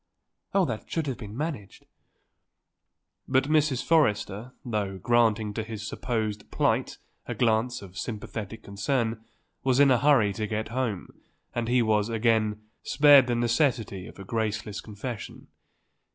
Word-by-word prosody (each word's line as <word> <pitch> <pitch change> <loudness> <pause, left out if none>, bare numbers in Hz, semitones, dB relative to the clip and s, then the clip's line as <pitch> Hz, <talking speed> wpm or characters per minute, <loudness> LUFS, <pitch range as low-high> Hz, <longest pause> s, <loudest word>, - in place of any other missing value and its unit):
Oh, 195 -2 +4
that 115 -6 -5
should 165 -2 -1
have 135 -3 -4
been 105 -1 -8
managed." 145 - -5 1.4
But 130 0 +3
Mrs. 150 -3 +2
Forrester, 115 -7 +1
though 105 -5 -2
granting 110 0 +2
to 110 - -2
his 110 -1 -6
supposed 110 -4 -3
plight - - 0 0.3
a - - -3
glance 115 0 +1
of 95 -1 -9
sympathetic 110 -1 -6
concern, 110 +2 -1 0.4
was 130 0 +2
in 140 -1 +6
a 125 - +4
hurry 125 -7 +4
to 105 +2 -3
get 110 +1 -3
home 115 -6 -3 0.3
and 120 -1 -2
he 120 0 +3
was, 105 -1 +2
again, 110 -2 +1 0.2
spared 145 -2 +6
the 120 - +1
necessity 120 - 0
of - - -13
a 100 - -8
graceless 105 -1 -2
confession. 110 +1 -7
115 Hz, 140 wpm, -27 LUFS, 105-125 Hz, 1.4 s, in